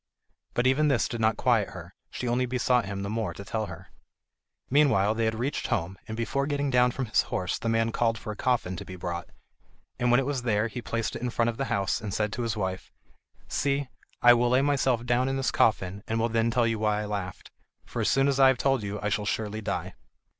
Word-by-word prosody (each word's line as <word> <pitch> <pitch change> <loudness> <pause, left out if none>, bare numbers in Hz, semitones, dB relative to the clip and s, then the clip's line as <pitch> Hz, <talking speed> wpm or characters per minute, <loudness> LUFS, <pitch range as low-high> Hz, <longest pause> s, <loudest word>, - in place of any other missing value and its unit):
But 120 - +1
even 135 +4 +3
this 140 -5 +2
did 120 -5 -4
not 110 0 +2
quiet - - +2
her; - - -10 0.2
she 125 - -5
only 125 +1 +1
besought 125 -1 +1
him 100 0 -4
the - - -3
more 110 -1 -2
to 100 - -8
tell 110 +2 -2
her. - - -10 0.8
Meanwhile 130 -8 +3
they 115 0 0
had 110 0 0
reached 130 +5 -2
home, 95 -4 -1
and 110 - -5
before 140 +4 -1
getting 145 -1 -1
down 125 0 +4
from 130 +1 -3
his 110 - +3
horse 90 -1 -2
the 115 - -2
man 115 0 +1
called 115 -1 +1
for 110 - -6
a - - -6
coffin 115 -6 0
to - - -6
be 95 - -9
brought; 85 -1 -5 0.7
and 125 - +2
when 120 +1 +5
it 135 - 0
was 140 -2 -1
there 115 -2 +1
he 125 - -6
placed 115 -1 -3
it - - -5
in 125 - -1
front 115 0 +1
of 115 - -4
the 135 - -1
house, 100 -5 0
and 105 -3 -4
said 105 0 -1
to 120 - -3
his 115 -3 -2
wife: 95 -2 -3 0.6
"See, 140 -1 -1 0.3
I 120 0 +9
will 120 0 +2
lay 130 +2 +4
myself 135 -4 +1
down 125 +2 +2
in 135 - -1
this 135 - 0
coffin, 100 -2 +1
and 115 +1 -1
will 115 +1 +1
then 115 0 +1
tell 120 0 +2
you 115 -1 0
why 105 -1 +1
I - - -3
laughed, 100 -3 -5 0.3
for - - -4
as - - +2
soon 135 +1 +3
as 140 -1 +1
I 135 - +8
have 130 -1 +4
told 135 -1 +1
you 105 0 -4
I 105 - +1
shall 105 0 -1
surely 110 0 -2
die." - - -3
115 Hz, 245 wpm, -27 LUFS, 105-125 Hz, 0.8 s, I